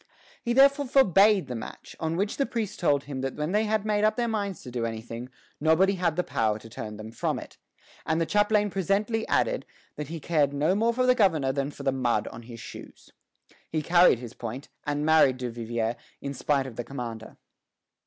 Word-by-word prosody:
He 235 - -1
therefore 275 +2 +5
forbade 205 - +5
the 130 - -6
match; 115 - -8
on 160 +1 -1
which 200 +3 -1
the 275 - +1
priests 215 -3 -3
told 145 -5 +1
him 135 -2 -5
that 135 0 -3
when 150 +3 -2
they 210 +2 +2
had 215 -1 0
made 210 -1 +1
up 215 0 +3
their 240 -1 0
minds 205 -4 -3
to 125 - -8
do 120 -1 -2
anything, 115 +2 -5 0.3
nobody 160 +6 +4
had 175 -4 0
power 110 -2 0
to 115 +1 -13
turn 105 -2 -6
them 110 +1 -8
from - - -1
it; - - -10 0.4
and 160 +1 0
the 165 - +1
chaplain 205 +3 +2
presently 200 +5 0
added - - +1 0.3
that 150 - -4
he 165 +2 -6
cared 145 -2 +1
no 150 +5 +2
more 225 +4 +2
for 255 +2 +1
the 250 - +6
governor 165 - +2
than 140 +1 -1
for 145 - -10
the 135 - +2
mud 120 -5 0
on 115 - -10
his 115 0 -10
shoes. - - -11 0.6
He 155 -1 -1
carried 175 -4 +5
his 120 -1 -9
point, 120 +4 -7 0.2
and 145 0 -1
married 155 -5 +5
Duvivier 120 -2 -2 0.2
in 140 0 -5
spite 140 0 0
of 125 -4 -9
the 120 - -2
commander. 115 -4 -7
155 Hz, 205 wpm, -27 LUFS, 125-205 Hz, 0.6 s, the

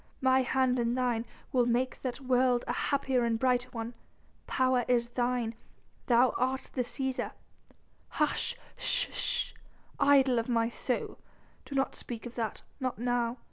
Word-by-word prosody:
My 260 -1 +4
hand 255 -1 +2
in 235 0 +1
thine, 245 -2 0 0.3
we'll 245 -2 +3
make 245 +2 0
that 255 0 -3
world 250 -1 +3
a - - 0
happier 265 -3 +1
and 230 -1 +1
brighter 250 0 +1
one. 230 -1 -5 0.5
Power 255 -1 +2
is 240 -1 +2
thine... 240 -2 0 0.5
thou 245 +1 +5
art 260 +1 -1
the 255 - 0
Cæsar...." 260 +1 -2 0.8
"Hush 300 - 0 0.2
sh - - +1
sh, - - 0 0.5
idol 275 -3 +5
of 230 - -3
my 230 -1 +2
soul! 245 +1 -3 0.5
Do 280 - -7
not 270 0 +1
speak 235 -1 -6
of 240 - -7
that... 225 -4 -3 0.2
not 255 -2 -2
now 245 0 0
250 Hz, 150 wpm, -30 LUFS, 240-260 Hz, 0.8 s, thou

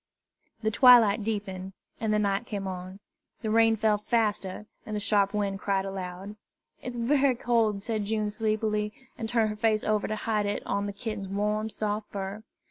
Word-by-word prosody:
The 220 - +1
twilight 230 -3 +7
deepened, 195 -3 -4 0.3
and 220 -1 0
the 210 - +3
night 205 +2 0
came 200 -2 -4
on. 185 +1 -6 0.4
The 215 - -1
rain 225 0 +5
fell 215 -1 +2
faster, 210 -3 -1 0.2
and 215 - -5
the - - 0
sharp 200 -1 +2
wind 200 -2 -1
cried 195 -1 0
aloud. 195 +1 -6 0.4
"It's 250 -1 -5
bery 265 +2 +3
cold," 225 -4 +1
said 215 -3 -2
June 210 0 -1
sleepily, 215 -1 0 0.2
and 225 -1 -5
turned 225 -2 +2
her - - -5
face 215 0 +1
over 215 -1 +1
to 215 - -2
hide 210 -1 -1
it 205 - -3
on 200 0 -1
the - - -3
kitten's 205 -1 -5
warm, 210 +2 -1
soft 210 0 -3
fur. 200 +1 -5
210 Hz, 180 wpm, -28 LUFS, 200-220 Hz, 0.4 s, twilight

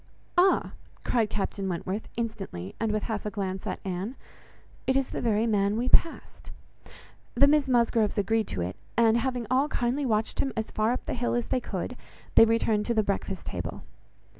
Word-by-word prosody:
"Ah!" 370 +2 +4 0.3
cried 230 -4 +1
Captain 195 -1 -2
Wentworth, 185 +4 -3
instantly, 195 - -4
and 225 -1 0
with 215 0 -1
half 220 -2 -3
a 210 - -2
glance 195 -2 -4
at - - -3
Anne, 190 +6 -3 0.7
"it 265 - +3
is 270 -1 0
the - - -4
very 220 -1 +2
man 205 -2 +2
we 245 +2 0
passed." 335 - +1 0.9
The 265 +4 +7
Miss 285 -1 +3
Musgroves 235 -4 +2
agreed 220 +2 +1
to 90 - -3
it; 90 +2 -3 0.2
and 230 -1 +5
having 245 0 -1
all 265 +3 +3
kindly 260 0 -1
watched 215 -1 0
him 270 - 0
as 220 - -2
far 215 +2 +1
up 250 - -3
the - - -2
hill 240 0 -1
as 240 - 0
they - - +2
could, 220 +1 -4 0.4
they - - +8
returned 225 -2 +1
to 235 - +1
the 215 - +3
breakfast 195 -2 -3
table. 90 -1 -5
225 Hz, 190 wpm, -27 LUFS, 200-245 Hz, 0.9 s, they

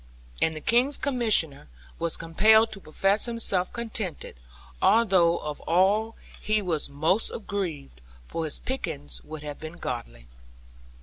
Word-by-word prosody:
And 160 - +2
the 155 - -6
King's 250 - +2
Commissioner 215 - +1 0.3
was 170 - -2
compelled 220 +7 +4
to 195 - -7
profess 195 +5 +1
himself 220 -6 0
contented, 220 -7 -4 0.5
although 185 -7 +4
of 150 -1 -6
all 200 +6 +3 0.3
he 215 +1 +1
was 175 -7 -1
most 160 +9 +1
aggrieved; 170 - -5 0.2
for 165 - -3
his 155 - +1
pickings 165 - -4
would 155 -1 -8
have 145 -1 -7
been 160 +2 -8
goodly. - - -6
180 Hz, 130 wpm, -26 LUFS, 155-220 Hz, 0.5 s, compelled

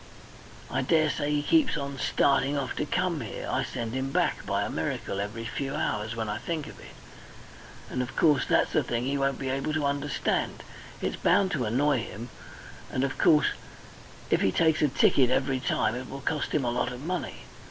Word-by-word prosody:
I - - +1
daresay 155 +1 +2
he 145 -1 +1
keeps 280 - +3
on 140 -1 -4
starting 140 +1 +2
off 135 -3 -2
to - - -1
come - - 0
here. - - -6
I - - 0
send 115 -1 -4
him 130 +1 -2
back, - - +1
by - - +1
a - - -3
miracle, 100 - -3
every 105 +3 -4
few 135 +3 -3
hours, 110 -7 -1
when 110 -1 -2
I 105 +1 -3
think 160 -1 -3
of - - -11
it. - - -13 0.9
And, 125 - -2
of 125 +1 -5
course, 150 -5 +3
that's - - +2
a - - +4
thing 120 0 -2
he 135 +2 -1
won't 135 -1 +1
be 135 - -3
able 135 +3 -1
to 155 -2 0
understand, 140 0 -1 0.4
and - - -1
it's - - -9
bound 190 +1 +3
to 125 -5 0
annoy 130 +5 +2
him; 115 +2 -7 0.6
and, 130 - 0
of 135 - -2
course, 150 -1 +5 0.8
if - - +3
he 95 - +3
takes 160 - +2
a 150 - +5
ticket 130 -1 +4
every 130 0 +1
time 120 -3 +1
it 125 +1 -6
will 135 0 -7
cost 155 0 -1
him 150 -4 +1
a 120 - +1
lot 125 +1 0
of 125 +1 -7
money. 180 +2 -4
135 Hz, 205 wpm, -28 LUFS, 125-150 Hz, 0.9 s, course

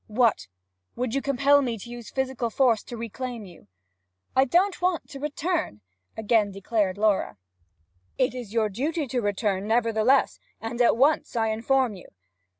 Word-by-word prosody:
What? 220 - +1 0.5
Would 245 -1 -2
you 275 - 0
compel 280 +1 +3
me 240 -4 -2
to 205 - -10
use 240 -2 -8
physical 265 -3 -2
force 235 -2 +2
to 240 - -8
reclaim 235 0 -6
you?' 175 - -15 0.7
'I 265 - +5
don't 360 +8 +2
want 360 -2 0
to 275 - -9
return!' 300 - -2 0.4
again 220 -1 +2
declared 195 0 -1
Laura. 205 - +1 0.8
'It 255 -1 +1
is 245 -5 -7
your 225 -1 +1
duty 295 - -2
to 250 -1 -2
return 205 -1 -1
nevertheless, 230 +3 +2 0.2
and 230 +2 -3
at 235 - +4
once, 285 +2 +2
I 225 -1 +1
inform 240 +2 +1
you.' 185 - -12
235 Hz, 155 wpm, -25 LUFS, 215-270 Hz, 0.8 s, I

